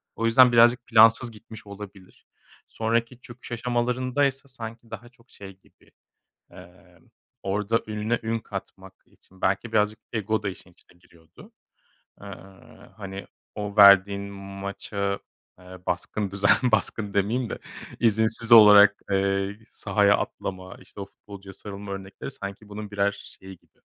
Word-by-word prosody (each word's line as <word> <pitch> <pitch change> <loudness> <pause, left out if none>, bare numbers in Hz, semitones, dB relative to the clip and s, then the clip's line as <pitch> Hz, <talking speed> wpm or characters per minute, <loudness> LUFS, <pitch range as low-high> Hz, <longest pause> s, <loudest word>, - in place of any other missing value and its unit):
O 115 - -2
yüzden, 125 +2 +6
birazcık 120 +1 +4
plansız 115 +1 +5
gitmiş 110 0 -14
olabilir. 100 -2 -12 0.4
Sonraki 115 +2 -2
çöküş 120 0 -13
aşamalarında 125 +3 -1
ise 135 0 -3
sanki 115 -3 -10
daha 120 - -9
çok 125 -1 -28
şey 95 -1 -12
gibi, - - -28 0.6
eee, - - -17 0.4
orada 105 +3 -1
ününe 110 +2 -2
ün 115 0 -2
katmak 95 -2 -9
için 95 0 -25
belki 100 +5 -1
birazcık 105 -1 +1
ego 110 -1 -1
da 100 - -1
işin 95 -1 -11
içine 85 - -24
giriyordu. 85 -2 -19 0.7
Eee, 100 - -11 0.7
hani, 95 -1 -8 0.3
o 105 0 -6
verdiğin 100 -1 +7
maça, 100 0 -5 0.4
eee, 90 0 -13
baskın 100 +3 -3
düzen 100 +1 +1 0.2
baskın 105 -2 -1
demeyeyim 110 +5 0
de, - - -5 0.4
izinsiz 110 +1 +1
olarak, 105 -2 +8
eee, 100 +1 0
sahaya 100 0 +2
atlama, 95 -1 -6
işte, - - -13
o 100 - -6
futbolcuya 100 -1 -13
sarılma 100 0 -9
örnekleri 95 +6 -8
sanki 100 -3 -9
bunun 105 0 -8
birer 100 0 0
şeyi 95 -2 -13
gibi. - - -36
105 Hz, 135 wpm, -25 LUFS, 100-115 Hz, 0.7 s, olarak